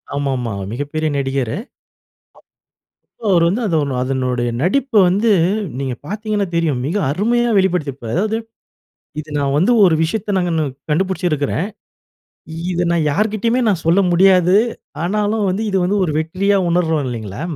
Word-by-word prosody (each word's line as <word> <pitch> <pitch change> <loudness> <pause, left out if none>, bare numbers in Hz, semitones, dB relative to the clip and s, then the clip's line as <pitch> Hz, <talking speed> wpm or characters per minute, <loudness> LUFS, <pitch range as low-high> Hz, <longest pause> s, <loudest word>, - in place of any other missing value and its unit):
ஆமாமா. 135 -4 -2 0.2
மிகப்பெரிய 145 +5 -2
நடிகரு. 135 -1 -1 1.6
அப் 220 - -3
அவரு 170 -2 +4
வந்து 210 +8 0
அதனோ 150 -6 0
அதனுடைய 125 -2 -1
நடிப்ப 255 - 0
வந்து 205 +5 +2 0.5
நீங்க 135 -2 -2
பார்த்தீங்கன்னா 210 -1 -2
தெரியும். 160 -6 +1
மிக 190 +6 -1
அருமையா 235 +7 +1
வெளிப்படுத்தியிருப்பாரு 145 -11 -1
அதாவது 215 +3 0 0.8
இது 155 - -8
நான் 140 -1 0
வந்து 185 +10 +3
ஒரு 170 -4 +5
விஷயத்த 205 +5 -2
நாங்க 170 -3 0 0.3
கண்டுபிடிச்சிருக்கிறேன். 170 -1 0 1.0
இத 175 0 0
நான் 165 -3 +1
யார்கிட்டயுமே 220 - 0
நான் 185 -6 0
சொல்ல 175 +4 +4
முடியாது. 185 0 +4 0.5
ஆனாலும் 210 +2 0
வந்து 195 +4 -1
இது 195 - +1
வந்து 205 +3 +1
ஒரு 165 - -1
வெற்றியா 195 +5 +1
உணர்றோம் 160 -3 +1
இல்லேங்களா? 110 -1 -6
175 Hz, 130 wpm, -18 LUFS, 145-200 Hz, 1.6 s, ஒரு